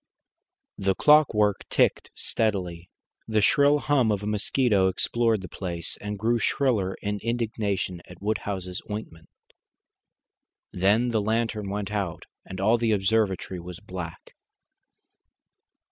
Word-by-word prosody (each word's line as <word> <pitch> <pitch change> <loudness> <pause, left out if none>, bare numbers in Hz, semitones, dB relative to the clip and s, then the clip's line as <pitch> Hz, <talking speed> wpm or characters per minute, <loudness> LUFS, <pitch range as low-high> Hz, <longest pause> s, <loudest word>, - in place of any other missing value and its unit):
The 95 -1 +1
clockwork 115 -10 +4
ticked - - +2
steadily. 90 -6 -2 0.4
The 110 -1 +2
shrill 145 +7 +4
hum 140 -6 +2
of 105 -1 -1
a - - -4
mosquito 105 -1 +2
explored 115 +3 +1
the - - -6
place 85 -3 -4
and 105 0 -5
grew 115 +3 +1
shriller 110 -8 +1
in 105 0 -2
indignation 105 -6 -2
at 90 - -13
Woodhouse's 95 -3 -3
ointment. 95 -6 -7 1.4
Then 105 +7 +2
the 110 -2 +1
lantern 110 -1 -1
went 100 0 -3
out 100 -5 -3 0.2
and 95 - -8
all 110 +5 +3
the 115 -2 +2
observatory 95 -2 0
was 90 +1 -9
black. 90 -4 -8
105 Hz, 120 wpm, -26 LUFS, 95-115 Hz, 1.4 s, clockwork